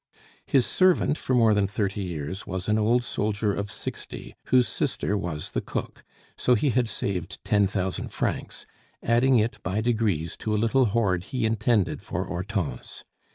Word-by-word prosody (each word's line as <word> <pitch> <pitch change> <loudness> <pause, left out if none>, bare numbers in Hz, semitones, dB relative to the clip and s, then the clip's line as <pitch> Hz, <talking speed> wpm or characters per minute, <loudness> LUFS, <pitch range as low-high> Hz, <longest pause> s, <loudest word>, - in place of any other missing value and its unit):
His 130 -4 +4
servant 185 -5 +3
for 130 - 0
more 115 -3 +5
than 105 -1 +2
thirty 100 -1 -2
years 90 0 -5
was 95 0 -4
an 105 0 +2
old 120 +3 +3
soldier 105 -2 -1
of 100 +1 -3
sixty, - - -6
whose 125 -1 +4
sister 105 - -1
was 85 -7 -4
the - - -1
cook, - - -5 0.3
so 125 - +3
he 130 +5 +2
had 120 -1 +1
saved 95 -6 -3
ten 105 -1 +3
thousand 95 -1 -2
francs, - - -3 0.4
adding 120 +3 +4
it 105 -2 0
by 95 +3 -1
degrees 110 -8 0
to 110 -1 -1
a - - +2
little 115 +4 +3
hoard 100 -5 +1
he 125 -1 -2
intended 110 -2 +1
for - - -3
Hortense. 90 -1 -4
105 Hz, 165 wpm, -26 LUFS, 95-115 Hz, 0.4 s, more